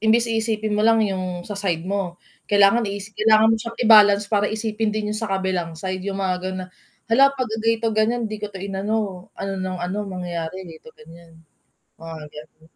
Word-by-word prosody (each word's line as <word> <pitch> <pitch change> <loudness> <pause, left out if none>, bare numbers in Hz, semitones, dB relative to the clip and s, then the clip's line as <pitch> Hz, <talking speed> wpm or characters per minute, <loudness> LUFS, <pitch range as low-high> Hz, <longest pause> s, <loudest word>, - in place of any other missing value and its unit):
imbis 230 +1 +3
iisipin 220 -1 -1
mo - - +2
lang 225 -1 +5
yung 185 -3 -3
sa 205 0 -6
side 175 -4 -1
mo, 190 -3 -3 0.3
kailangan 205 +3 +4
iis 200 +1 -6
kailangan 215 +1 +4
mo 225 - +2
siyang 230 +1 -7
i-balance 210 -3 +7
para 205 -1 +2
isipin 220 0 -2
din 210 -1 -2
yung 215 - -2
sa 225 -2 -3
kabilang 185 -4 -2
side 185 +2 -4
yung 195 - -2
mga 185 -1 0
ganun 185 0 -4
na, - - -12 0.4
"Hala 275 +4 +5
'pagka 245 -4 -3
ganito 225 +1 +1
ganiyan, 230 +2 +1
di 215 - -5
ko 210 - -3
'to 200 - -11
inano, 195 -1 -3
ano 195 - -4
ng 185 -1 -3
ano, 180 +4 -3
mangyayari 180 -1 -5
ganito 165 +5 -13
ganiyan." 165 +1 -16 0.6
Mga 165 0 -8 0.2
ganun. 155 +1 -13
200 Hz, 195 wpm, -22 LUFS, 185-220 Hz, 0.6 s, i-balance